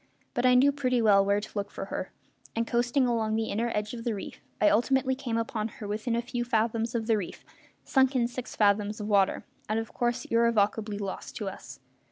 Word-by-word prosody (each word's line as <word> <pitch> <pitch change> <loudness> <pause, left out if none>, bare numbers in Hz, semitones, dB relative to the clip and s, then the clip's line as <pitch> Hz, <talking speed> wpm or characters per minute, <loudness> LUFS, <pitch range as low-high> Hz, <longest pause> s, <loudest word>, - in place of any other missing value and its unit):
But 245 +1 +2
I 250 - +6
knew 275 +3 +6
pretty 255 -3 0
well 205 -3 +5
where 200 +1 +2
to 205 - -8
look 200 -1 -3
for - - -6
her, - - -5 0.4
and, 230 0 0
coasting 245 +3 +1
along 225 -3 0
the 220 0 -1
inner 230 +3 -1
edge 210 +1 -2
of 230 -1 -6
the 230 -3 -1
reef, 195 - -8 0.2
I 210 - +4
ultimately 260 +5 +3
came 245 -3 -3
upon 225 -1 -2
her 210 - -6
within 220 +3 -2
a 235 - -1
few 245 0 -3
fathoms 230 0 0
of 225 -1 -1
the 225 -1 +3
reef, 190 -4 -6 0.4
sunk 265 0 +3
in 240 -2 +3
six 245 +1 -7
fathoms 210 0 +2
of 210 - -4
water, 200 -2 +2 0.2
and 215 - +1
of 225 - -6
course 240 -1 -1
irrevocably 220 -2 +1
lost 200 -2 -6
to 210 - -4
us. 190 - -11
230 Hz, 220 wpm, -28 LUFS, 210-245 Hz, 0.4 s, I